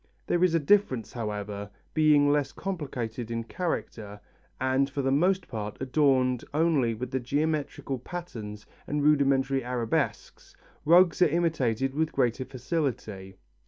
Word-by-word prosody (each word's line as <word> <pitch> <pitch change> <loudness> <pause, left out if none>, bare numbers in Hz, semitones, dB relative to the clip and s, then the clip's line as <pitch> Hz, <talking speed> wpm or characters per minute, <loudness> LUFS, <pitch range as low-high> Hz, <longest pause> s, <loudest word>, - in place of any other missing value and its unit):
There 175 0 +1
is 180 -2 +3
this 165 - +2
difference, 135 - +2
however: 105 -3 -4 0.2
being 150 -2 +4
less 145 -1 +1
complicated 125 - -4
in 115 0 -2
character 115 - -4 0.4
and 130 +1 +1
for 140 0 -3
the 135 - +1
most 180 +6 +2
part 105 -2 -5
adorned 130 -2 +2
only 150 -8 +2
with 125 +2 -4
geometrical 145 -1 -1
patterns 115 - -7 0.2
and 145 0 -1
rudimentary 135 -2 +3
arabesques, 120 -2 -3 0.3
rugs 175 +2 +5
are 180 - +7
imitated 135 -6 0
with 160 +2 -1
greater 130 -1 0
facility. 125 - -4
135 Hz, 125 wpm, -27 LUFS, 115-155 Hz, 0.4 s, are